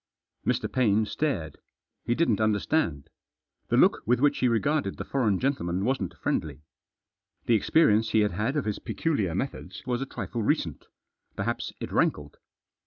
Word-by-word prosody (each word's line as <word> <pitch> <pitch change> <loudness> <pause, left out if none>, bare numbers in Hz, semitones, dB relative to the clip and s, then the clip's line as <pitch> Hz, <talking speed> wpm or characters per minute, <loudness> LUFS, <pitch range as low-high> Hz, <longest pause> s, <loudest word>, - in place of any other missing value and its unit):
Mr. - - +1
Paine 110 -4 +2
stared. 105 - -2 0.5
He 120 - +1
didn't 120 -10 +2
understand. 105 - 0 0.6
The - - +1
look - - +4
with 125 +1 +3
which 145 +1 +3
he 125 - +3
regarded 140 +6 0
the - - -5
foreign 115 -8 +1
gentleman 95 -9 -1
wasn't 125 -9 -1
friendly. 75 -1 -2 0.8
The 120 - +3
experience 110 -1 +3
he 110 +1 +3
had 105 - +2
had 105 - -1
of 150 - 0
his 105 -1 -2
peculiar 105 - -1
methods 135 +8 -5
was 125 0 -1
a 135 - -3
trifle 120 -2 -4
recent. 105 - -1 0.5
Perhaps - - -3
it - - -6
rankled. - - 0
110 Hz, 155 wpm, -27 LUFS, 100-135 Hz, 0.8 s, look